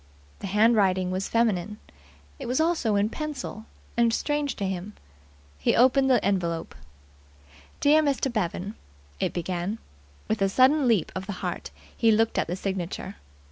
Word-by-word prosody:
The -, -, -5 dB
handwriting 195 Hz, -3 st, +3 dB
was 190 Hz, +1 st, -2 dB
feminine. 210 Hz, -3 st, +1 dB, 0.6 s
It 265 Hz, -, -6 dB
was 250 Hz, +4 st, 0 dB
also 315 Hz, -10 st, +1 dB
in 205 Hz, +1 st, +2 dB
pencil, 270 Hz, -7 st, -6 dB, 0.3 s
and 235 Hz, -1 st, +3 dB
strange 295 Hz, +4 st, -1 dB
to 200 Hz, -, -3 dB
him. 190 Hz, +2 st, -4 dB, 0.7 s
He 75 Hz, -, +2 dB
opened 265 Hz, +3 st, +4 dB
the 255 Hz, -, +3 dB
envelope. 170 Hz, -4 st, -1 dB, 1.1 s
"Dear 300 Hz, +2 st, +5 dB
Mr. 275 Hz, -3 st, 0 dB
Bevan" 200 Hz, -1 st, -2 dB, 0.5 s
(it -, -, 0 dB
began). 180 Hz, +4 st, -3 dB, 0.5 s
With 220 Hz, -2 st, -1 dB
a 195 Hz, -, +3 dB
sudden 260 Hz, +6 st, +4 dB
leap 220 Hz, -8 st, +2 dB
of 190 Hz, +1 st, -5 dB
the 205 Hz, -, -3 dB
heart -, -, -4 dB, 0.3 s
he 230 Hz, -, +3 dB
looked 225 Hz, +1 st, +2 dB
at -, -, 0 dB
the 175 Hz, -, -2 dB
signature. 190 Hz, 0 st, -4 dB
215 Hz, 150 wpm, -26 LUFS, 190-255 Hz, 1.1 s, Dear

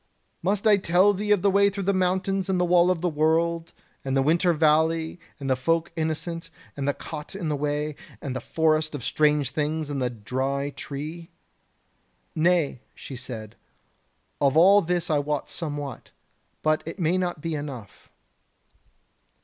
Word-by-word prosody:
Must 200 Hz, +4 st, 0 dB
I 210 Hz, -2 st, +6 dB
tell 185 Hz, +2 st, +4 dB
thee 205 Hz, +2 st, -3 dB
of 205 Hz, -3 st, +3 dB
the 200 Hz, -, +4 dB
way 200 Hz, +1 st, +5 dB
through 200 Hz, 0 st, -4 dB
the 200 Hz, +2 st, +2 dB
mountains 190 Hz, +1 st, 0 dB
and 185 Hz, -1 st, +1 dB
the 180 Hz, -, +3 dB
Wall 175 Hz, 0 st, +4 dB
of 180 Hz, -3 st, 0 dB
the 180 Hz, -, +1 dB
World, 165 Hz, +2 st, +1 dB, 0.3 s
and 135 Hz, 0 st, 0 dB
the 135 Hz, -, +3 dB
Winter 170 Hz, +5 st, +3 dB
Valley, 160 Hz, +1 st, +2 dB, 0.2 s
and 140 Hz, -, -5 dB
the 130 Hz, -, +3 dB
Folk 165 Hz, +6 st, 0 dB
Innocent, 165 Hz, +1 st, -3 dB, 0.3 s
and 140 Hz, -1 st, -3 dB
the 145 Hz, -, +2 dB
Cot 150 Hz, +5 st, -8 dB
on 175 Hz, -5 st, -3 dB
the 150 Hz, -, 0 dB
Way, 150 Hz, +1 st, -2 dB, 0.2 s
and 135 Hz, -3 st, -5 dB
the -, -, -3 dB
Forest 155 Hz, -1 st, +1 dB
of 135 Hz, -, -6 dB
Strange 150 Hz, -2 st, +2 dB
Things 150 Hz, 0 st, -2 dB
and 140 Hz, -2 st, -2 dB
the 125 Hz, -, +1 dB
Dry 130 Hz, +5 st, -2 dB
Tree?" 155 Hz, +5 st, -7 dB, 1.0 s
"Nay," 160 Hz, -6 st, +2 dB
she 135 Hz, -, -9 dB
said, 115 Hz, -4 st, -7 dB, 0.9 s
"of 140 Hz, +1 st, +3 dB
all 195 Hz, +5 st, +7 dB
this 175 Hz, -1 st, -1 dB
I 150 Hz, -, +3 dB
wot 145 Hz, 0 st, -2 dB
somewhat, 145 Hz, -6 st, -5 dB, 0.5 s
but 155 Hz, 0 st, +2 dB
it 165 Hz, -, -5 dB
may 165 Hz, -4 st, +1 dB
be 185 Hz, -, +2 dB
not 175 Hz, -4 st, -3 dB
enough." 145 Hz, -, -6 dB
160 Hz, 170 wpm, -25 LUFS, 145-180 Hz, 1.0 s, all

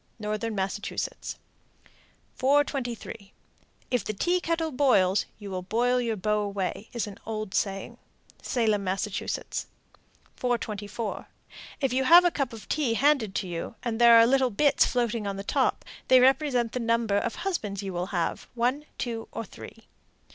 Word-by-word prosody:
Northern 215 Hz, +1 st, -3 dB
Massachusetts. 195 Hz, +1 st, -3 dB, 1.0 s
423. 255 Hz, -7 st, -1 dB, 0.6 s
"If 250 Hz, -2 st, +1 dB
the 215 Hz, -, -3 dB
tea 355 Hz, -, +1 dB
kettle 330 Hz, -2 st, -1 dB
boils, 210 Hz, -9 st, +3 dB
you 205 Hz, -2 st, -8 dB
will 185 Hz, -1 st, -3 dB
boil 245 Hz, +6 st, +1 dB
your 230 Hz, -2 st, -1 dB
beaux 210 Hz, +2 st, 0 dB
away," 200 Hz, 0 st, -3 dB
is 235 Hz, -, -2 dB
an 205 Hz, -2 st, -10 dB
old 215 Hz, -3 st, -5 dB
saying. 195 Hz, -1 st, -2 dB, 0.4 s
Salem, 215 Hz, -4 st, +1 dB
Mass. 190 Hz, 0 st, -1 dB
424. 215 Hz, +1 st, -5 dB, 0.5 s
If 270 Hz, -3 st, +1 dB
you 265 Hz, +1 st, +1 dB
have 345 Hz, +5 st, +8 dB
a 350 Hz, -, +4 dB
cup 275 Hz, -6 st, -2 dB
of 225 Hz, -2 st, -10 dB
tea 275 Hz, -7 st, 0 dB
handed 265 Hz, -7 st, +2 dB
to 190 Hz, -, -1 dB
you, 170 Hz, +4 st, -5 dB
and 235 Hz, -1 st, -2 dB
there 235 Hz, -1 st, +8 dB
are 230 Hz, 0 st, +8 dB
little 260 Hz, +1 st, +3 dB
bits 280 Hz, +6 st, +3 dB
floating 235 Hz, -3 st, -1 dB
on 200 Hz, -1 st, -3 dB
top, -, -, 0 dB, 0.2 s
they 255 Hz, -, +7 dB
represent 260 Hz, -2 st, +3 dB
the 250 Hz, -, -3 dB
number 230 Hz, -3 st, +1 dB
of -, -, -3 dB
husbands 210 Hz, -, -3 dB
you 195 Hz, -1 st, -4 dB
will 175 Hz, +1 st, -2 dB
have 175 Hz, -4 st, -2 dB
one, 250 Hz, +5 st, 0 dB
two, 230 Hz, -2 st, -4 dB
or 230 Hz, -, -5 dB
three. 225 Hz, +3 st, -12 dB
230 Hz, 155 wpm, -27 LUFS, 205-255 Hz, 1.0 s, have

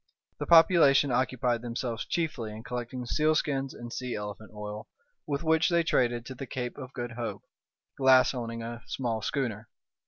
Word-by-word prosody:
The -, -, -3 dB
population 160 Hz, -5 st, +6 dB
occupied 125 Hz, -1 st, +1 dB
themselves 120 Hz, 0 st, -4 dB
chiefly 145 Hz, -10 st, -2 dB
in 110 Hz, +1 st, -9 dB
collecting 125 Hz, 0 st, -5 dB
sealskins 145 Hz, -1 st, +1 dB
and 120 Hz, 0 st, -8 dB
sea 125 Hz, -1 st, -3 dB
elephant 105 Hz, 0 st, -6 dB
oil, 105 Hz, 0 st, -7 dB, 0.4 s
with 140 Hz, +1 st, -2 dB
which 160 Hz, 0 st, +3 dB
they 170 Hz, -1 st, +3 dB
traded 120 Hz, -6 st, +1 dB
to 130 Hz, -, -6 dB
the 130 Hz, +1 st, -7 dB
Cape 125 Hz, -1 st, -4 dB
of 130 Hz, -2 st, -8 dB
Good 120 Hz, -2 st, -4 dB
Hope, 120 Hz, -1 st, -5 dB, 0.6 s
Glass 130 Hz, -1 st, +6 dB
owning 115 Hz, -2 st, -4 dB
a 115 Hz, +1 st, -6 dB
small 115 Hz, -4 st, -2 dB
schooner. 110 Hz, -3 st, -2 dB
125 Hz, 160 wpm, -29 LUFS, 115-135 Hz, 0.6 s, population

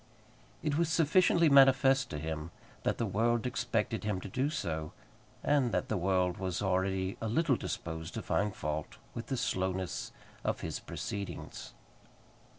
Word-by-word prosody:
It 150 Hz, 0 st, +1 dB
was 170 Hz, -2 st, +2 dB
sufficiently 170 Hz, +1 st, +4 dB
manifest 135 Hz, -1 st, +6 dB
to 75 Hz, -, -4 dB
him 80 Hz, +1 st, -4 dB, 0.3 s
that -, -, 0 dB
the 115 Hz, -, 0 dB
world 115 Hz, +3 st, +1 dB
expected 115 Hz, -4 st, -1 dB
him 105 Hz, -3 st, -1 dB
to -, -, -6 dB
do 130 Hz, +9 st, 0 dB
so, 80 Hz, -, -3 dB, 0.5 s
and 140 Hz, -5 st, +3 dB
that -, -, 0 dB
the 110 Hz, -, +1 dB
world 90 Hz, -1 st, +1 dB
was 95 Hz, -2 st, -2 dB
already 95 Hz, 0 st, 0 dB
a 115 Hz, -, -1 dB
little 140 Hz, +5 st, +2 dB
disposed 80 Hz, -6 st, -5 dB
to -, -, -3 dB
find 100 Hz, -1 st, 0 dB
fault 75 Hz, 0 st, -3 dB, 0.2 s
with 115 Hz, 0 st, -6 dB
the 135 Hz, -, -1 dB
slowness 95 Hz, -3 st, -1 dB, 0.3 s
of -, -, -1 dB
his -, -, -3 dB
proceedings. 100 Hz, -1 st, -6 dB
105 Hz, 155 wpm, -32 LUFS, 95-135 Hz, 0.5 s, manifest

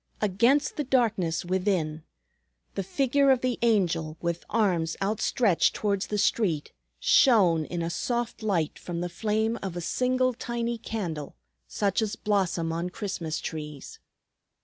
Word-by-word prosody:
Against 235 Hz, +8 st, +2 dB
the 295 Hz, -, 0 dB
darkness 220 Hz, -, +1 dB
within, 180 Hz, -4 st, 0 dB, 0.7 s
the -, -, -2 dB
figure 275 Hz, +7 st, +2 dB
of 260 Hz, -2 st, +4 dB
the 255 Hz, -1 st, -1 dB
Angel 170 Hz, -9 st, +1 dB
with 170 Hz, 0 st, -2 dB
arms 180 Hz, -7 st, +1 dB
outstretched 210 Hz, -1 st, +2 dB
towards 200 Hz, -2 st, -1 dB
the 210 Hz, -, -2 dB
street 185 Hz, -8 st, +1 dB, 0.3 s
shone 185 Hz, -, +5 dB
in 170 Hz, +1 st, -3 dB
a 165 Hz, -, -2 dB
soft 240 Hz, +4 st, -2 dB
light 185 Hz, -8 st, -1 dB
from 170 Hz, -1 st, -5 dB
the 175 Hz, -, -2 dB
flame 220 Hz, +5 st, -1 dB
of 185 Hz, -3 st, -4 dB
a -, -, -3 dB
single 255 Hz, +6 st, +1 dB
tiny 235 Hz, 0 st, -3 dB
candle 175 Hz, -11 st, -4 dB, 0.3 s
such 200 Hz, 0 st, 0 dB
as 220 Hz, 0 st, -1 dB
blossom 185 Hz, -6 st, 0 dB
on 170 Hz, +2 st, -2 dB
Christmas 180 Hz, -5 st, -4 dB
trees. 150 Hz, -3 st, -7 dB
200 Hz, 140 wpm, -27 LUFS, 170-230 Hz, 0.7 s, shone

